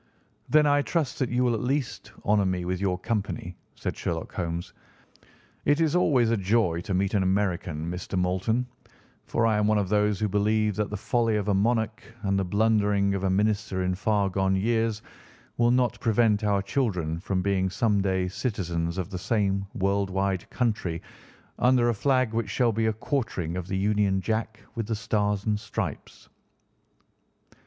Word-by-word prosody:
"Then 150 0 +5
I 145 0 +4
trust 150 -3 -1
that 130 - 0
you 125 0 +2
at 115 - -1
least 135 +2 -2
will - - -3
honour 100 -2 +3
me 90 -1 -1
with 90 +1 -2
your 95 -2 +1
company," 100 -4 -3 0.2
said - - -4
Sherlock - - -4
Holmes. 85 0 -4 0.9
"It 145 +2 +3
is 160 0 +2
always 130 -10 +3
a 115 - +2
joy 95 -4 +1
to 95 +1 -2
meet 95 +1 0
an 100 - +3
American, 95 -4 0
Mr. 90 +1 -4
Moulton, 95 +7 0 0.6
for 115 - +1
I 110 -2 +3
am 105 - +2
one 110 0 +3
of 100 -3 0
those 105 -1 +2
who 110 - +1
believe 105 +1 +1
that 105 -1 0
the 105 - -4
folly 115 +2 +1
of 105 0 -1
a - - +3
monarch 110 +2 +1 0.2
and 100 -1 +1
the - - +1
blundering 100 0 +2
of 100 -1 -2
a - - +2
minister 100 -1 0
in 90 0 0
far 100 +1 +1
gone 95 0 +1
years 110 +1 0 0.5
will 120 0 +4
not 120 -1 +2
prevent 110 -2 +2
our 100 -2 +1
children 90 - -1
from 95 +1 -1
being 95 -1 +1
some 105 +1 +1
day 95 -1 0
citizens 85 -5 -2
of 95 +2 -3
the 90 - -4
same 100 -2 0
world 100 +1 0
wide 95 -1 -1
country 105 -9 -1 0.6
under 125 -1 +4
a - - +2
flag 130 0 +1
which 115 -2 -1
shall 120 +4 +2
be 110 +1 0
a 110 - +1
quartering 105 - -2
of 90 -1 -4
the 95 - -2
Union 100 -1 +2
Jack 110 +2 -2
with 115 -4 -4
the 115 - -1
Stars 105 -1 -1
and 105 -1 +1
Stripes." 105 -1 -5
105 Hz, 180 wpm, -26 LUFS, 95-115 Hz, 0.9 s, Then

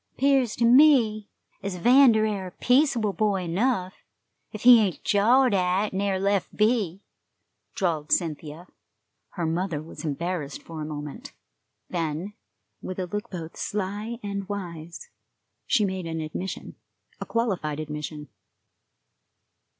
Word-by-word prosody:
"'Pears 270 -4 +2
like 235 - +3
ter - - +5
me 245 -8 +5 0.3
ez 195 -2 -4
'Vander 235 +2 +5
air 200 -3 -2
a - - -9
peaceable 250 -6 +2
boy 200 0 0
enough, 185 +2 0 0.6
ef 215 - -8
he 245 -1 +9
ain't 190 -7 -2
jawed 240 +4 +4
at 190 +2 +1
an' 190 - -1
air 195 -2 0
lef' 200 -1 0
be," 210 -4 +1 0.7
drawled 160 -6 -1
Cynthia. 160 0 -1 0.7
Her 170 - -2
mother 165 0 -1
was 155 0 -10
embarrassed 155 -1 -3
for 160 -2 -8
a - - -3
moment. 145 -2 -7 0.5
Then, 165 +3 -3 0.5
with 185 - -6
a 185 - -2
look 205 +3 -5
both 165 -3 -7
sly 210 +3 -3
and 200 -1 -4
wise, 170 -5 -7 0.6
she 210 - +3
made 190 -3 -3
an 160 0 -3
admission 160 +4 -6 0.4
a - - -5
qualified 190 -11 -1
admission. 150 -1 -6
190 Hz, 135 wpm, -25 LUFS, 165-215 Hz, 0.7 s, he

